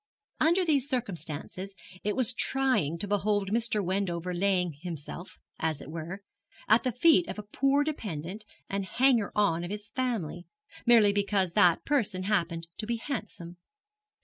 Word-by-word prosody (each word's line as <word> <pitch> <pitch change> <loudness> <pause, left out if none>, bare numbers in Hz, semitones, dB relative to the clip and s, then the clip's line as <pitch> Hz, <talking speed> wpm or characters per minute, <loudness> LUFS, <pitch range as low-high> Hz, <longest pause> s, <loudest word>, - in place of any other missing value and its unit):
Under 345 +4 +3
these 285 -4 +2
circumstances 190 - -4 0.3
it 210 0 0
was 255 -1 +3
trying 255 - +1
to 205 - -3
behold 205 0 0
Mr. 225 -2 +1
Wendover 180 -2 -1
laying 180 -2 +1
himself, 175 +1 -7 0.2
as 160 -2 -1
it 150 - -9
were, 170 +5 -6 0.4
at 220 +2 +5
the 255 - 0
feet 325 +8 +4
of - - -6
a 210 - -5
poor 275 +7 +2
dependent 205 - -5 0.2
and 200 0 -2
hanger 240 +1 +2
on 175 -5 +2
of 175 - -5
his 205 0 -6
family, 215 -10 -2 0.4
merely 220 -4 +6
because 200 -3 +1
that 175 -1 +4
young - - -49
person 215 -10 +1
happened 170 -4 -1
to 215 - -3
be 235 - 0
handsome. 215 - -6
200 Hz, 155 wpm, -29 LUFS, 175-240 Hz, 0.4 s, merely